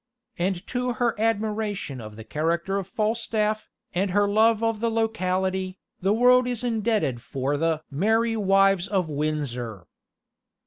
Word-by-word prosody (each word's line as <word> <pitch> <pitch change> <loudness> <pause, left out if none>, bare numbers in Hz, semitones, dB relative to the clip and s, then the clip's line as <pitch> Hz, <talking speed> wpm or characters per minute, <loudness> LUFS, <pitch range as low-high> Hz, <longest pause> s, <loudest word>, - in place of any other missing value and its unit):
And 180 +1 -1
to 250 -1 -1
her 235 0 +1
admiration 210 - -1
of 110 -1 -9
the 110 - -9
character 170 - -1
of 190 - -6
Falstaff, 215 0 -1 0.2
and 190 +2 0
her 205 +2 +3
love 220 +2 +3
of 225 -1 +1
the 230 +1 +1
locality, 190 -4 -1 0.2
the 190 +2 +2
world 250 +3 +5
is 245 -1 -2
indebted 215 - 0
for 135 +3 -2
the 160 +1 0
"Merry 225 +9 +2
Wives 195 -2 +3
of 185 -5 0
Windsor." 130 - -3
195 Hz, 140 wpm, -25 LUFS, 165-225 Hz, 0.2 s, world